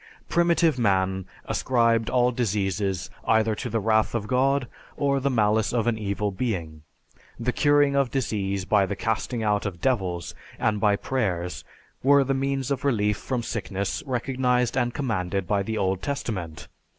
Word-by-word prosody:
Primitive 170 -4 +2
man 95 -3 +1 0.2
ascribed 115 -3 +1
all 125 0 +3
diseases 100 -5 -1 0.2
either 110 0 +3
to 120 +4 -4
the 115 0 0
wrath 110 +2 +2
of 110 -3 -1
God, 130 +3 +1 0.3
or 140 -1 +1
the 140 +1 0
malice 110 -3 +2
of 120 -2 0
an 120 -1 +2
evil 100 0 -1
being. 90 -8 -3 0.6
The 120 +2 0
curing 145 -1 +3
of 140 -2 +2
disease 100 -7 -2
by 100 -2 +3
the 100 - -3
casting 110 +2 -2
out 105 -1 +1
of 90 -3 -6
devils 95 -8 -1 0.2
and 105 -1 0
by 105 -2 +4
prayers 95 -8 -2 0.4
were 140 +1 +5
the 135 +1 0
means 135 0 -1
of 135 -1 -1
relief 105 -7 +1
from 125 0 -3
sickness 100 -4 -3
recognized 125 -1 0
and 120 0 +1
commanded 100 -8 -2
by 100 -1 +1
the 110 +3 -3
Old 95 -1 0
Testament. 95 - -4
110 Hz, 160 wpm, -25 LUFS, 100-130 Hz, 0.6 s, were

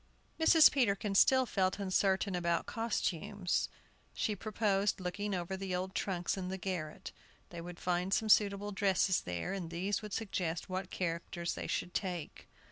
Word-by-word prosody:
Mrs. 320 -1 +7
Peterkin 210 -6 +1
still 260 +6 +5
felt 190 -5 0
uncertain 195 0 +1
about 170 -1 0
costumes. 205 -4 -1 0.5
She 210 - 0
proposed 205 -1 0
looking 195 +2 -2
over 180 +1 -3
the 190 -1 -3
old 185 +1 -3
trunks 180 -1 -1
in 185 -1 -3
the 190 - -3
garret. 175 -5 -4 0.4
They 170 -1 -6
would 175 0 -8
find 180 +1 -1
some 220 +2 +2
suitable 205 -1 +3
dresses 195 -2 +2
there, 90 - -3
and 185 -4 -4
these 185 +4 -1
would 210 -2 -7
suggest 180 -6 -2
what 185 +1 -3
characters 170 0 -3
they - - -5
should 180 - -2
take. 180 -5 -4
190 Hz, 155 wpm, -33 LUFS, 175-205 Hz, 0.5 s, Mrs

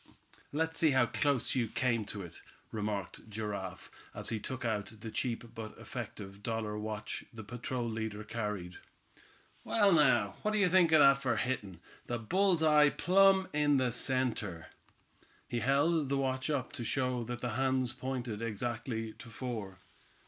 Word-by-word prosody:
"Let's 160 +2 -1
see 160 - +5
how 125 - +6
close 135 0 +1
you 125 -3 +1
came 115 -1 0
to 100 -1 -6
it," 85 - -11 0.3
remarked 105 -1 -4
Giraffe, 100 -3 -5 0.2
as - - -4
he 115 - -2
took 130 +3 -5
out 105 -3 -1
the 110 - -6
cheap 120 -1 -2
but 110 -2 -7
effective 100 0 -7
dollar 110 -1 -2
watch 105 0 -4
the 110 -1 -9
patrol 120 +2 -3
leader 110 -2 -3
carried. 105 -6 -4 0.8
"Well, 205 -3 +3
now, 120 - +4
what 215 0 0
d'ye 200 -3 +4
think 175 -2 +5
of 155 -2 +7
that 140 -1 +6
for 130 -3 +1
hittin' 100 -6 -2 0.3
the 120 - -1
bull's 180 - +2
eye 150 -1 +6
plumb 190 +3 +4
in 145 -1 +3
the 130 -2 +2
center." 115 -8 -1 0.8
He 120 - -2
held 140 +4 +2
the 140 - +1
watch 130 0 -1
up 140 -4 -1
to 120 - -5
show 125 0 0
that 120 +1 -5
the 125 - -2
hands 130 0 +1
pointed 125 -4 -4
exactly 115 0 -3
to 115 - -10
four. 110 -5 -5
120 Hz, 160 wpm, -32 LUFS, 110-135 Hz, 0.8 s, of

